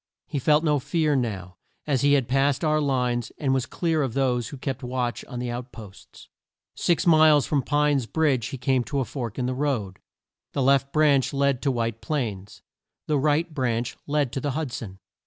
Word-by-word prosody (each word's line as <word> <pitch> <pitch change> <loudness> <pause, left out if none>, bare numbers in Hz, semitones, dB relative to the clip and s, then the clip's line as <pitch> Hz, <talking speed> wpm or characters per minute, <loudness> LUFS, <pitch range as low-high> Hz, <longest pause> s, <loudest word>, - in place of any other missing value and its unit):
He 145 - -3
felt 150 +4 +3
no 150 -3 +2
fear 150 +2 0
now, 95 -8 -3 0.3
as 140 -4 +1
he 145 0 +4
had 135 -4 +2
passed 135 +3 +1
our 155 -1 +2
lines, 125 -4 0
and 135 -3 0
was 130 -2 0
clear 165 -3 0
of 130 -5 -2
those 125 -4 +1
who 140 - -8
kept 130 0 -4
watch 125 -1 -3
on 125 - -8
the 120 0 -3
out 120 +1 -6
posts. 105 -5 -13 0.5
Six 175 - +1
miles 155 -4 +6
from 145 -3 +1
Pine's 145 -3 +1
Bridge 140 -7 +1
he 135 - -6
came 130 0 +1
to 140 - -2
a 130 - 0
fork 120 -6 -5
in 125 - -1
the 130 - -1
road. 125 -9 -2 0.5
The 140 - 0
left 135 +1 +3
branch 145 -4 +3
led 140 -2 +1
to 140 - +1
White 115 -2 -2
Plains. 110 -10 -4 0.4
The 150 -2 +1
right 155 +3 +1
branch 120 -4 -1
led 145 -3 0
to 135 - -3
the 145 -1 -2
Hud 155 -5 -3
son. 100 -5 -7
135 Hz, 200 wpm, -25 LUFS, 120-145 Hz, 0.5 s, miles